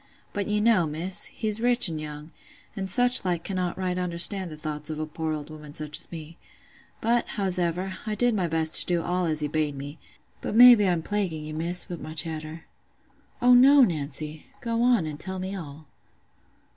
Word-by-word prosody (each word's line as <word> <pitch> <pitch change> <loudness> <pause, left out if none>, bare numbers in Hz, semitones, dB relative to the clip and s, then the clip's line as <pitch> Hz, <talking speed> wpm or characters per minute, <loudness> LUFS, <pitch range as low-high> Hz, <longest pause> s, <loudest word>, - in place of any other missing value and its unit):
But 200 -1 -3
you 210 0 0
know, 210 -7 +3
Miss, 165 +5 +4
he's 215 -1 -3
rich 245 -2 +4
an' 160 -2 -5
young, 150 +1 -8 0.4
and 190 -2 -4
such 245 +4 +4
like 175 -3 -2
cannot 185 -3 -3
right 185 -1 -2
understand 180 +2 0
the 155 - -9
thoughts 150 0 -6
of 155 -1 -5
a 155 - -2
poor 160 +1 -4
old 155 0 -6
woman 150 -1 -11
such 150 0 -3
as - - -2
me. 165 0 -10 0.6
But, 235 +1 +1
howsever, 185 -1 -1
I 215 - -2
did 245 +2 +2
my 190 -5 0
best 160 -1 -1
to - - +2
do 175 -2 0
all 180 0 -1
as 155 -1 0
he 150 - -1
bade 150 -1 -2
me—but 145 +8 -10
maybe 235 -4 +8
I'm 170 -2 -1
plaguing 180 -7 -3
you, 155 - -7
Miss, 170 +3 +1
wi' 175 - -6
my 155 0 -9
chatter." 160 +1 -4 0.8
"Oh, 250 0 +6
no, 270 +3 +7
Nancy! 155 - -2
Go 230 -1 -2
on, 240 -8 +3
and 150 -1 -6
tell 190 +2 -6
me 190 +1 -5
all." 155 -4 -9
175 Hz, 195 wpm, -25 LUFS, 155-200 Hz, 0.8 s, maybe